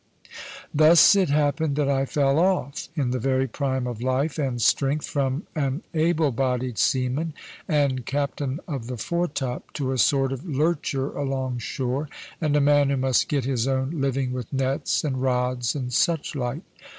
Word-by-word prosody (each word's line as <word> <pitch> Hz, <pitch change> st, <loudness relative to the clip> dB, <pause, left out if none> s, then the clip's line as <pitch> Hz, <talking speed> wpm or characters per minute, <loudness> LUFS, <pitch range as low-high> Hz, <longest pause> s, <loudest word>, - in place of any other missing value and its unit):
Thus 155 Hz, +6 st, +7 dB
it 190 Hz, -5 st, +2 dB
happened 145 Hz, +1 st, +1 dB
that 145 Hz, -1 st, +1 dB
I 135 Hz, -1 st, +1 dB
fell 140 Hz, +1 st, +2 dB
off, 175 Hz, -6 st, 0 dB
in 135 Hz, -6 st, 0 dB
the 130 Hz, -, -1 dB
very 130 Hz, +2 st, +1 dB
prime 130 Hz, 0 st, -2 dB
of 120 Hz, -2 st, -5 dB
life 135 Hz, +5 st, 0 dB
and 130 Hz, -4 st, -1 dB
strength, 135 Hz, +6 st, +2 dB
from 140 Hz, +2 st, -1 dB
an 140 Hz, 0 st, -2 dB
able 160 Hz, -2 st, +2 dB
bodied 125 Hz, -1 st, -1 dB
seaman 135 Hz, +5 st, 0 dB, 0.3 s
and 140 Hz, -6 st, +1 dB
captain 140 Hz, +1 st, -2 dB
of 135 Hz, -8 st, -4 dB
the 125 Hz, -1 st, -5 dB
foretop 145 Hz, -4 st, -3 dB
to 130 Hz, -2 st, -2 dB
a 130 Hz, -, -1 dB
sort 135 Hz, +1 st, +3 dB
of 135 Hz, +2 st, -7 dB
lurcher 145 Hz, -3 st, -1 dB
along 135 Hz, -3 st, -2 dB
shore, 130 Hz, +4 st, -3 dB, 0.3 s
and 150 Hz, -2 st, +1 dB
a -, -, +4 dB
man 145 Hz, 0 st, +4 dB
who 140 Hz, -, +1 dB
must 130 Hz, -1 st, +2 dB
get 140 Hz, -4 st, 0 dB
his 130 Hz, -2 st, 0 dB
own 130 Hz, +1 st, 0 dB
living 135 Hz, -4 st, -1 dB
with 125 Hz, -3 st, -5 dB
nets 135 Hz, +2 st, 0 dB
and 130 Hz, -4 st, -2 dB
rods 125 Hz, -1 st, 0 dB
and 125 Hz, -3 st, -4 dB
suchlike. 140 Hz, -3 st, 0 dB
135 Hz, 165 wpm, -24 LUFS, 130-150 Hz, 0.3 s, Thus